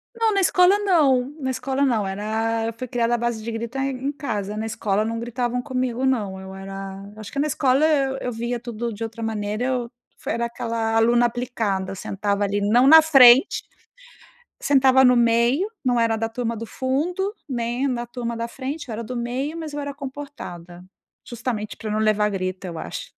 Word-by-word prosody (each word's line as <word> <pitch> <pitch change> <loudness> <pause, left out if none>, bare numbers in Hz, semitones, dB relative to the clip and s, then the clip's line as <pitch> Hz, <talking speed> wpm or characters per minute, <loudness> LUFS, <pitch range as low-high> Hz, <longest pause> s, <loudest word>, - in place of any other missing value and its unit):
Não, 450 -1 +2
na 395 -1 +2
escola 365 +2 +5
não, 295 -9 +2
na 260 -1 -2
escola 265 +2 -1
não, 230 -7 +2
era 225 +3 -1
eu 230 - -3
fui 255 +3 -7
criada 240 0 +1
a - - 0
base 235 -2 -2
de 230 - -4
grito 235 +3 -5
em 270 +1 -2
casa, 210 -8 -4
na 220 +1 -3
escola, 210 -1 0
não 230 +1 -3
gritavam 240 +1 -2
comigo 255 -1 -2
não, 205 -7 0
eu 190 0 -9
era 195 0 -7
eu - - -13
acho 215 - -9
que 280 - -4
na 300 - +2
escola 270 0 +2
eu 270 -3 +1
eu 250 - -3
via 235 +1 -3
tudo 235 -1 -5
de 225 +2 -6
outra 225 0 -6
maneira, 215 +1 -2
eu 250 -2 -2 0.3
foi - - -3
era 235 0 -1
aquela 230 -1 -2
aluna 235 +2 +4
aplicada, 225 -6 -2
sentava 200 +1 -2
ali, 200 0 0
não 235 +6 +4
na 320 +3 +9
frente, 270 -2 +6 1.0
sentava 265 -1 +5
no 250 -1 +6
meio, 235 - +3 0.2
não 245 -2 +2
era 230 -1 +2
da 225 +1 -2
turma 230 0 -3
do 225 +1 -6
fundo, 350 +10 -1 0.2
né, 240 +2 -1
na 240 -2 -2
turma 235 -1 -5
da 230 0 -3
frente 270 +3 -6
eu - - -4
era 230 +2 -4
do 250 +3 -6
meio, 260 +7 -3
mas 315 -3 -6
eu 295 - -3
era 285 0 -4
comportada 260 - -9 0.4
justamente, 230 -3 -4
para 220 - -6
não 215 - 0
levar 215 -1 +2
grito, 185 0 -3
eu 170 -2 -6
acho. - - -7
235 Hz, 200 wpm, -23 LUFS, 220-265 Hz, 1.0 s, na